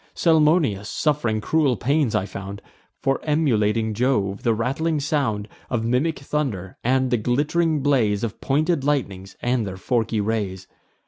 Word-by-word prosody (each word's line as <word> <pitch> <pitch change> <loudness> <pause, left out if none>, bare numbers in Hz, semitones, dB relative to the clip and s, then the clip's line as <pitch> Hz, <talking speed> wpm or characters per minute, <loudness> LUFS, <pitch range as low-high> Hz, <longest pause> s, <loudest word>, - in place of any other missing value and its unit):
Salmoneus, 150 - +3
suff'ring 135 -8 0
cruel 140 -1 +2
pains, 140 0 +1
I 95 - +1
found, 100 0 -8 0.3
For 135 -1 0
emulating 115 -8 +1
Jove; 105 -4 0
the 115 -2 +2
rattling 150 +7 -1
sound 135 -8 -1 0.2
Of 115 -2 -1
mimic 130 +7 +1
thunder, 130 -11 -3
and 130 +1 +1
the 120 - +2
glitt'ring 145 +6 +1
blaze 115 -8 +2
Of 115 - -4
pointed 150 +2 +1
lightnings, 100 -10 -2
and 120 -1 +1
their 95 -1 -6
forky 115 +2 0
rays. 100 -3 -2
125 Hz, 140 wpm, -23 LUFS, 105-145 Hz, 0.3 s, Salmoneus